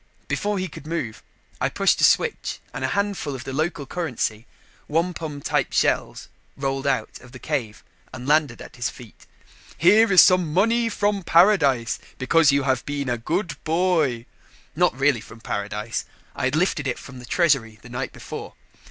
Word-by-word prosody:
Before 205 0 -1
he 185 0 -2
could 150 -2 -11
move, 155 -10 -4 0.4
I - - +1
pushed - - +2
a - - +1
switch - - +2 0.2
and - - -5
a - - +2
handful 200 -8 -2
of 125 - -7
the 135 - -6
local 155 0 -1
currency, 125 -8 -3 0.4
wampum 160 -2 -2
type - - 0
shells, - - 0 0.3
rolled 135 0 -2
out 120 -5 -1
of 125 0 -16
the - - -8
cave 125 -7 -3 0.3
and 125 +1 -8
landed 150 -5 +2
at - - -13
his 120 0 -1
feet. 120 -3 -14 0.5
"Here 210 +5 +5
is 185 - +7
some 180 -4 +6
money 230 +7 +2
from 205 -1 0
paradise, 165 - +3 0.2
because 150 +3 +4
you 140 0 +2
have 130 -2 0
been 145 -2 -2
a 120 - 0
good 165 - -3
boy." 160 -8 +1 0.5
Not 175 -5 +2
really 135 -4 +3
from 115 - -13
paradise 105 +1 -4 0.3
I - - -2
had 130 +3 +1
lifted 155 -4 +1
it 125 - -2
from 135 -2 -11
the 125 - -10
treasury 135 -9 +1
the - - -11
night 120 - -4
before. - - -8
145 Hz, 175 wpm, -23 LUFS, 125-175 Hz, 0.5 s, is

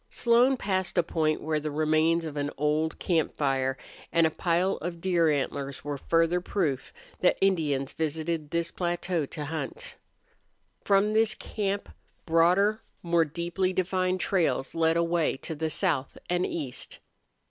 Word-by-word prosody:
Slone 245 +3 +4
passed 190 -4 -1
a 175 - +5
point 155 -2 0
where 155 0 0
the 155 +1 -3
remains 155 +2 +2
of 155 -2 -6
an 145 0 -1
old 150 +2 0
camp 165 -4 0
fire 135 -2 0 0.3
and 165 -1 +4
a 160 - +2
pile 175 +4 +1
of 170 +1 -5
deer 170 -2 +2
antlers 140 -1 -2
were 145 -1 -4
further 165 +3 +2
proof 155 -9 -2 0.3
that 180 - +3
Indians 150 -8 +1
visited 160 0 -2
this 170 +1 -1
plateau 175 -3 -1
to 150 +1 -6
hunt. 155 -2 -6 0.9
From 200 +1 +3
this 220 0 +4
camp 200 -1 -3 0.4
broader, 180 +6 +3 0.2
more 170 -1 +3
deeply 170 +4 -2
defined 185 0 0
trails 170 -8 0
led 165 0 +2
away 170 -4 +1
to 160 - -5
the 160 +1 -2
south 155 -6 -1
and 180 +1 0
east. 135 -6 -4
165 Hz, 145 wpm, -28 LUFS, 155-185 Hz, 0.9 s, a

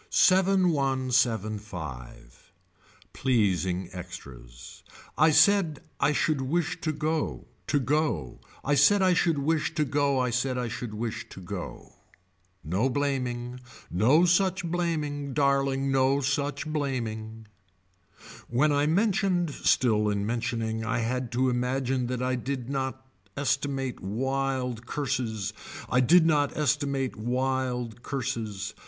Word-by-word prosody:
Seven 190 0 +4
one 135 -4 0
seven 110 -4 +1
five. 65 - -10 0.6
Pleasing 95 -7 +1
extras. - - -10 0.3
I 155 +1 +5
said 160 0 +4 0.2
I 140 +1 +3
should 150 -1 +1
wish 165 +5 -1
to 155 - 0
go, 155 +1 -2 0.2
to 145 - +2
go, 125 - -1 0.3
I 145 - +2
said 190 +8 +5
I 185 -1 +4
should 165 -2 +2
wish 155 +2 0
to 155 -3 +1
go 140 0 +1
I 125 -1 +1
said 125 +2 0
I 125 -2 -2
should 110 -1 -5
wish 115 +1 -4
to - - -10
go. 95 0 -8 0.7
No 95 - 0
blaming, 125 -3 -2 0.3
no 125 - +4
such 180 0 +2
blaming, 150 -5 -2
darling 135 -1 +2
no 135 +1 +3
such 145 +2 -1
blaming. 115 -7 -3 1.0
When 135 +6 +3
I 145 +1 +2
mentioned 185 -2 +1
still 110 -6 +2
in 100 -1 -1
mentioning 115 -1 -2
I 115 - -1
had 120 +1 -2
to 130 +2 +2
imagine 125 0 0
that 125 0 -2
I 130 0 0
did 130 0 -3
not 130 -1 -3 0.3
estimate 135 -1 -1
wild 125 +2 -2
curses. 120 -8 -2 0.4
I 125 - +4
did 160 +7 +6
not 145 -3 +2
estimate 140 -3 0
wild 125 0 -2
curses. 115 -8 -4
130 Hz, 125 wpm, -27 LUFS, 115-145 Hz, 1.0 s, did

